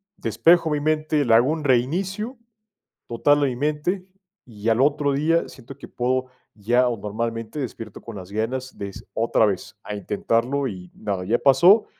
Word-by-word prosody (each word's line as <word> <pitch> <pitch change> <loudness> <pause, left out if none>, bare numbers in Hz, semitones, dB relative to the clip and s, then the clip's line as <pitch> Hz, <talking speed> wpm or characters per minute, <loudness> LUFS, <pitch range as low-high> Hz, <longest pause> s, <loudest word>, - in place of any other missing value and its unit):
despejo 165 - +3
mi 150 -1 0
mente, 155 -1 +1
le 115 - +3
hago 120 +5 +5
un 155 -2 -3
reinicio 190 - 0 0.7
total 145 +5 +2
a - - +4
mi 130 -3 -1
mente 150 +7 -1 0.4
y 110 -2 -4
al 115 +3 +3
otro 145 0 +2
día 160 +4 +1
siento 130 +1 -12
que 140 - -11
puedo 130 +1 -1 0.3
ya 120 +4 +2
o 120 - -3
normalmente 115 +5 -4
despierto 115 -5 -6
con 115 - -9
las 95 -1 -9
ganas 125 +5 -3
des 100 -1 -7
otra 115 0 +2
vez 105 +2 -3
a 105 - -6
intentarlo 115 +7 -1
y 90 -5 -8
nada, 100 -3 -3
ya 115 +5 +2
pasó, 175 - +5
130 Hz, 170 wpm, -23 LUFS, 110-150 Hz, 0.7 s, hago